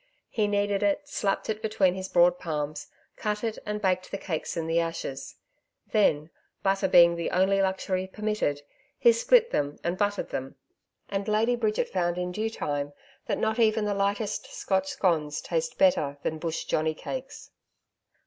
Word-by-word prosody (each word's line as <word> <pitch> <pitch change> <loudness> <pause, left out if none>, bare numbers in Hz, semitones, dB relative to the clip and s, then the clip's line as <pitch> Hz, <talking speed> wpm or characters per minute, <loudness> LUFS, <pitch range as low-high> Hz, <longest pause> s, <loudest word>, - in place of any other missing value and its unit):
He 215 -2 +1
kneaded 205 -1 +1
it, 295 -1 +1
slapped 200 -8 -1
it 220 0 -2
between 210 -4 +2
his 190 0 -5
broad 175 0 +4
palms, 150 -2 -3 0.3
cut 210 0 -2
it 225 -1 -2
and 210 0 -2
baked 185 -2 0
the - - -3
cakes 170 -3 -4
in 165 - -1
the 165 +1 +2
ashes; 140 -5 -4 0.6
then, 160 -7 +2 0.3
butter 195 0 +2
being 170 -2 +7
the 170 - -2
only 195 +2 +3
luxury 190 -1 -1
permitted, 210 -8 -2 0.3
he 240 -3 +6
split 460 - +4
them 145 0 -1
and 175 +2 -2
buttered 205 -1 0
them; 135 0 -4 0.5
and 195 0 -3
Lady 220 +3 +2
Bridget 220 -3 0
found 175 -2 -1
in 180 0 -2
due 215 +4 -1
time 145 -8 -3 0.3
that - - 0
not 220 +1 0
even 220 -1 +3
the 205 - 0
lightest 200 +1 -1
Scotch 190 -1 0
scones 155 -6 0
taste 165 -1 -2
better 150 -7 +3
than 160 - -2
bush 165 0 -3
johnny 155 0 0
cakes. 265 - -7
190 Hz, 170 wpm, -27 LUFS, 165-210 Hz, 0.6 s, being